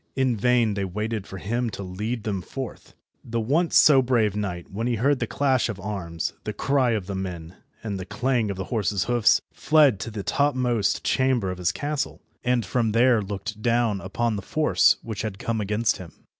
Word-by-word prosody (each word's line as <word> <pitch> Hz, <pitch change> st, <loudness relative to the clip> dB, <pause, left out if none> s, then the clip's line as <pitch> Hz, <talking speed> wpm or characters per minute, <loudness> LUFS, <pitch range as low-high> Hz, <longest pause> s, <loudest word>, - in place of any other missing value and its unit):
In 130 Hz, -3 st, +2 dB
vain 120 Hz, 0 st, +2 dB
they 100 Hz, -1 st, -2 dB
waited 105 Hz, +2 st, -3 dB
for 95 Hz, -, -8 dB
him 115 Hz, +5 st, -2 dB
to 100 Hz, -, -6 dB
lead 105 Hz, +5 st, -4 dB
them 100 Hz, -3 st, -2 dB
forth. 130 Hz, +7 st, -8 dB, 0.3 s
The 115 Hz, 0 st, -3 dB
once 150 Hz, +10 st, +1 dB
so 140 Hz, -3 st, +7 dB
brave 120 Hz, -5 st, +1 dB
knight, 90 Hz, -5 st, -4 dB
when 110 Hz, +5 st, -2 dB
he 120 Hz, -, +1 dB
heard 135 Hz, +5 st, +2 dB
the 115 Hz, -, -1 dB
clash 130 Hz, -3 st, +1 dB
of 105 Hz, -3 st, -5 dB
arms, 90 Hz, -5 st, -4 dB
the 105 Hz, -, -4 dB
cry 130 Hz, +1 st, +1 dB
of 105 Hz, -4 st, -2 dB
the 100 Hz, -, -5 dB
men, 90 Hz, -3 st, -5 dB, 0.3 s
and 100 Hz, -3 st, -3 dB
the 95 Hz, -, -5 dB
clang 120 Hz, +1 st, 0 dB
of 100 Hz, -, -4 dB
the 95 Hz, -, -3 dB
horses' 100 Hz, -3 st, 0 dB
hoofs, 120 Hz, -2 st, +3 dB
fled 150 Hz, -9 st, +4 dB
to -, -, -4 dB
the 105 Hz, -3 st, -5 dB
topmost 125 Hz, -7 st, +1 dB
chamber 130 Hz, -7 st, +1 dB
of 90 Hz, -, -7 dB
his 85 Hz, -2 st, +1 dB
castle, 145 Hz, -, -3 dB, 0.2 s
and 125 Hz, -2 st, +1 dB
from 115 Hz, -4 st, 0 dB
there 120 Hz, -1 st, +4 dB
looked 105 Hz, +2 st, -6 dB
down 115 Hz, -4 st, +1 dB
upon 110 Hz, +4 st, -1 dB
the -, -, -4 dB
force 155 Hz, +10 st, +3 dB
which 110 Hz, -3 st, -5 dB
had 110 Hz, -3 st, -4 dB
come 110 Hz, +1 st, -2 dB
against 105 Hz, +3 st, 0 dB
him. 90 Hz, -3 st, -10 dB
110 Hz, 200 wpm, -25 LUFS, 100-125 Hz, 0.3 s, so